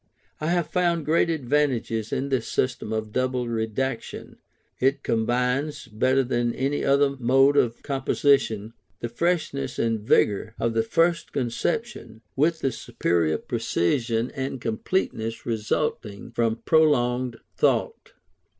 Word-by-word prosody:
I 155 Hz, -, -2 dB
have 175 Hz, 0 st, +1 dB
found 170 Hz, -3 st, 0 dB
great 165 Hz, +3 st, +3 dB
advantages 130 Hz, -7 st, 0 dB
in 140 Hz, 0 st, -1 dB
this 130 Hz, -4 st, 0 dB
system 125 Hz, -4 st, -1 dB
of 110 Hz, -1 st, -3 dB
double 130 Hz, 0 st, -1 dB
redaction. 115 Hz, +2 st, -3 dB, 0.4 s
It 135 Hz, +2 st, +1 dB
combines, 125 Hz, +5 st, 0 dB
better 130 Hz, +4 st, +2 dB
than 120 Hz, -1 st, -1 dB
any 140 Hz, +2 st, -1 dB
other 140 Hz, 0 st, +3 dB
mode 135 Hz, +3 st, +4 dB
of 120 Hz, -4 st, +1 dB
composition, 135 Hz, -5 st, +1 dB, 0.3 s
the 120 Hz, -, -3 dB
freshness 140 Hz, -2 st, -1 dB
and 115 Hz, -1 st, 0 dB
vigour 105 Hz, +1 st, +2 dB
of 115 Hz, 0 st, 0 dB
the 115 Hz, -, +2 dB
first 165 Hz, +9 st, +1 dB
conception, 130 Hz, -, -3 dB
with 160 Hz, +4 st, +1 dB
the 135 Hz, -, +1 dB
superior 85 Hz, -8 st, 0 dB
precision 115 Hz, +5 st, -1 dB
and 135 Hz, -1 st, -4 dB
completeness 115 Hz, -, -2 dB
resulting 110 Hz, -1 st, -2 dB
from 115 Hz, -1 st, -1 dB
prolonged 125 Hz, -6 st, +2 dB, 0.2 s
thought. -, -, 0 dB
125 Hz, 125 wpm, -25 LUFS, 115-140 Hz, 0.4 s, mode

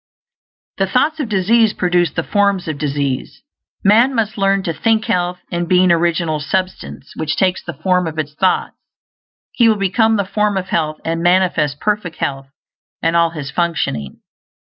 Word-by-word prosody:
The 195 Hz, -, +1 dB
thoughts 300 Hz, +10 st, +1 dB
of 270 Hz, -7 st, -3 dB
disease 215 Hz, +2 st, +3 dB
produce 175 Hz, -2 st, +1 dB
the 165 Hz, -, -2 dB
forms 200 Hz, -2 st, +1 dB
of 155 Hz, -3 st, -4 dB
disease. 140 Hz, -3 st, -3 dB, 0.4 s
Man 230 Hz, +7 st, +4 dB
must 220 Hz, -2 st, -1 dB
learn 195 Hz, -1 st, +1 dB
to 170 Hz, -4 st, -2 dB
think 220 Hz, +7 st, +1 dB
health; 180 Hz, 0 st, 0 dB
and 175 Hz, -1 st, -2 dB
being 185 Hz, -1 st, +4 dB
Original 170 Hz, -2 st, +1 dB
Substance 185 Hz, -2 st, -4 dB
which 155 Hz, -1 st, -2 dB
takes 185 Hz, -1 st, +1 dB
the -, -, -7 dB
form 180 Hz, +3 st, +1 dB
of 160 Hz, -1 st, -6 dB
its 150 Hz, -1 st, -3 dB
thoughts, 185 Hz, +4 st, 0 dB, 0.8 s
he 235 Hz, -2 st, +3 dB
will 220 Hz, -, +3 dB
become 220 Hz, +3 st, +2 dB
the 200 Hz, -, 0 dB
form 210 Hz, +1 st, 0 dB
of 190 Hz, 0 st, -4 dB
health 155 Hz, -2 st, -1 dB
and 165 Hz, 0 st, -1 dB
manifest 175 Hz, -5 st, +2 dB
perfect 210 Hz, -5 st, -2 dB
health 135 Hz, -1 st, -3 dB, 0.6 s
in 165 Hz, -, +2 dB
all 170 Hz, 0 st, +3 dB
his 150 Hz, -4 st, -7 dB
functioning. 145 Hz, -, -2 dB
180 Hz, 170 wpm, -17 LUFS, 160-200 Hz, 0.8 s, Man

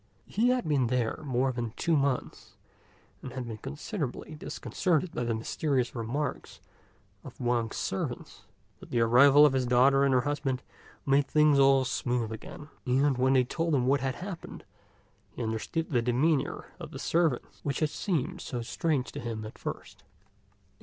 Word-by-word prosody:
He 235 Hz, +4 st, +1 dB
had 250 Hz, -7 st, +1 dB
been 140 Hz, -5 st, +2 dB
there 120 Hz, 0 st, 0 dB
more 130 Hz, -1 st, +1 dB
than 120 Hz, -3 st, -4 dB
two 165 Hz, -2 st, +1 dB
months, 140 Hz, -3 st, -2 dB, 0.7 s
and 130 Hz, -, -7 dB
had 130 Hz, -1 st, -4 dB
been 110 Hz, -2 st, -6 dB
considerably 150 Hz, -, -5 dB
disconcerted 165 Hz, +2 st, -1 dB
by -, -, -2 dB
the 115 Hz, -1 st, 0 dB
mysterious 125 Hz, +2 st, -1 dB
remarks 125 Hz, +5 st, -4 dB, 0.6 s
of -, -, -12 dB
Wang's 120 Hz, -2 st, 0 dB
servants; -, -, -4 dB, 0.4 s
but -, -, -13 dB
the 120 Hz, -, 0 dB
arrival 135 Hz, +6 st, +7 dB
of 145 Hz, -, +4 dB
his 130 Hz, -2 st, 0 dB
daughter 135 Hz, +3 st, +5 dB
and 140 Hz, -, +3 dB
her 130 Hz, -1 st, +4 dB
husband 135 Hz, -2 st, -2 dB, 0.4 s
made 140 Hz, 0 st, +3 dB
things 150 Hz, -1 st, +4 dB
all 135 Hz, -1 st, +5 dB
smooth 120 Hz, -2 st, -1 dB
again, 145 Hz, +7 st, -9 dB, 0.2 s
and 135 Hz, +1 st, +2 dB
when 130 Hz, +1 st, +3 dB
they 130 Hz, -1 st, +5 dB
told 165 Hz, +5 st, -1 dB
him 125 Hz, -2 st, +1 dB
what 135 Hz, +1 st, +2 dB
had 130 Hz, 0 st, -1 dB
happened, 185 Hz, -2 st, -8 dB, 0.7 s
he 125 Hz, -, -4 dB
understood 110 Hz, +9 st, -3 dB
the 120 Hz, -4 st, +2 dB
demeanour 130 Hz, +5 st, 0 dB
of -, -, -7 dB
the -, -, -8 dB
servants 165 Hz, -6 st, 0 dB
which 140 Hz, -2 st, -2 dB
had 155 Hz, -2 st, +1 dB
seemed 165 Hz, -10 st, -2 dB
so 120 Hz, -2 st, -4 dB
strange 145 Hz, +2 st, -1 dB
to -, -, -6 dB
him 115 Hz, -2 st, -5 dB
at 110 Hz, -, -10 dB
first. -, -, -7 dB
135 Hz, 165 wpm, -29 LUFS, 120-150 Hz, 0.7 s, arrival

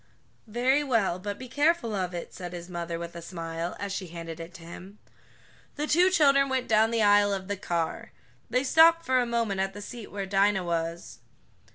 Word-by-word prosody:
"Very 255 Hz, +6 st, +2 dB
well, 225 Hz, -10 st, +1 dB
but 205 Hz, +2 st, -5 dB
be 260 Hz, -, -8 dB
careful 290 Hz, -2 st, +1 dB
of 185 Hz, -3 st, -2 dB
it," 175 Hz, -1 st, -7 dB
said 180 Hz, -1 st, -7 dB
his 175 Hz, -1 st, -7 dB
mother 170 Hz, -1 st, -4 dB
with 170 Hz, 0 st, -7 dB
a 170 Hz, -, -7 dB
smile, 165 Hz, 0 st, -5 dB
as 200 Hz, -1 st, -4 dB
she 190 Hz, -2 st, -4 dB
handed 165 Hz, -1 st, -8 dB
it 165 Hz, +1 st, -8 dB
to 165 Hz, -, -11 dB
him. 185 Hz, +4 st, -11 dB, 0.8 s
The 300 Hz, -, -2 dB
two 350 Hz, +5 st, +4 dB
children 275 Hz, -6 st, +4 dB
went 260 Hz, -1 st, -1 dB
down 220 Hz, 0 st, +4 dB
the 230 Hz, -1 st, +1 dB
aisle 205 Hz, 0 st, +5 dB
of 190 Hz, -1 st, -3 dB
the 205 Hz, -, -2 dB
car. 170 Hz, -4 st, -3 dB, 0.4 s
They 250 Hz, +3 st, +1 dB
stopped 330 Hz, +4 st, +5 dB
for 260 Hz, -3 st, +3 dB
a 245 Hz, -, 0 dB
moment 230 Hz, -5 st, 0 dB
at 195 Hz, 0 st, -2 dB
the -, -, -7 dB
seat 235 Hz, -1 st, -9 dB
where 200 Hz, -1 st, -4 dB
Dinah 195 Hz, 0 st, +2 dB
was. 170 Hz, 0 st, -3 dB
200 Hz, 205 wpm, -27 LUFS, 175-250 Hz, 0.8 s, aisle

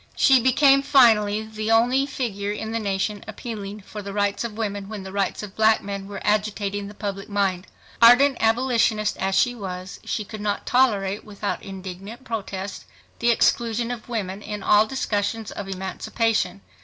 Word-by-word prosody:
She 265 Hz, -1 st, +5 dB
became 275 Hz, +2 st, +5 dB
finally 220 Hz, -6 st, +4 dB
the 220 Hz, 0 st, -5 dB
only 245 Hz, +5 st, +3 dB
figure 205 Hz, -7 st, -3 dB
in 220 Hz, +1 st, -4 dB
the 230 Hz, -, -1 dB
nation 200 Hz, 0 st, -2 dB
appealing 210 Hz, -2 st, -7 dB
for 210 Hz, +2 st, -8 dB
the 200 Hz, 0 st, -7 dB
rights 205 Hz, +1 st, 0 dB
of 225 Hz, -2 st, -5 dB
women 205 Hz, -3 st, -3 dB
when 210 Hz, -3 st, -6 dB
the 190 Hz, -, -8 dB
rights 200 Hz, +1 st, -1 dB
of 205 Hz, -2 st, -9 dB
black 220 Hz, 0 st, +3 dB
men 200 Hz, -1 st, -5 dB
were 200 Hz, 0 st, -6 dB
agitating 205 Hz, -1 st, 0 dB
the 205 Hz, -, -11 dB
public 200 Hz, -1 st, -5 dB
mind. 195 Hz, -2 st, 0 dB, 0.3 s
Ardent 250 Hz, +4 st, +7 dB
abolitionist 225 Hz, -2 st, +2 dB
as 190 Hz, 0 st, -1 dB
she 245 Hz, -, +3 dB
was, 185 Hz, -4 st, -7 dB
she 210 Hz, -, -2 dB
could 215 Hz, +1 st, -8 dB
not 205 Hz, -1 st, -2 dB
tolerate 210 Hz, -6 st, +2 dB
without 205 Hz, -1 st, -4 dB
indignant 195 Hz, +4 st, -8 dB
protest 200 Hz, -5 st, -5 dB, 0.3 s
the 235 Hz, -, +2 dB
exclusion 235 Hz, 0 st, +2 dB
of 240 Hz, -1 st, -7 dB
women 200 Hz, -4 st, -3 dB
in 210 Hz, -1 st, -6 dB
all 210 Hz, +1 st, +5 dB
discussions 220 Hz, -3 st, -2 dB
of 200 Hz, -, -6 dB
emancipation. 190 Hz, -, -1 dB
210 Hz, 170 wpm, -23 LUFS, 200-230 Hz, 0.3 s, Ardent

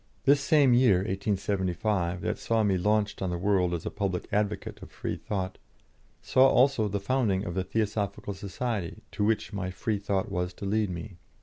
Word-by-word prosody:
This 140 Hz, 0 st, +5 dB
same 140 Hz, -3 st, +4 dB
year 120 Hz, -5 st, +5 dB
(1875) 95 Hz, -2 st, -1 dB
that -, -, -2 dB
saw 115 Hz, -1 st, +1 dB
me 100 Hz, -2 st, +2 dB
launched 105 Hz, +3 st, +1 dB
on 95 Hz, -, -1 dB
the 90 Hz, -, -2 dB
world 95 Hz, -1 st, +2 dB
as 85 Hz, -2 st, -3 dB
a -, -, -3 dB
public 95 Hz, -3 st, -2 dB
advocate 105 Hz, +1 st, -2 dB
of -, -, -10 dB
Freethought, 95 Hz, -2 st, -4 dB, 0.6 s
saw 130 Hz, +1 st, +5 dB
also 130 Hz, -4 st, +3 dB
the 100 Hz, 0 st, -2 dB
founding 100 Hz, -3 st, 0 dB
of 85 Hz, -, -4 dB
the 95 Hz, +1 st, -1 dB
Theosophical 105 Hz, -1 st, -2 dB
Society 100 Hz, 0 st, -4 dB
to -, -, -2 dB
which 110 Hz, 0 st, 0 dB
my 95 Hz, -2 st, -3 dB
Freethought 100 Hz, 0 st, -2 dB
was 90 Hz, -1 st, -2 dB
to 100 Hz, -, -7 dB
lead 105 Hz, +1 st, +1 dB
me. 90 Hz, +2 st, -7 dB
100 Hz, 175 wpm, -28 LUFS, 95-110 Hz, 0.6 s, This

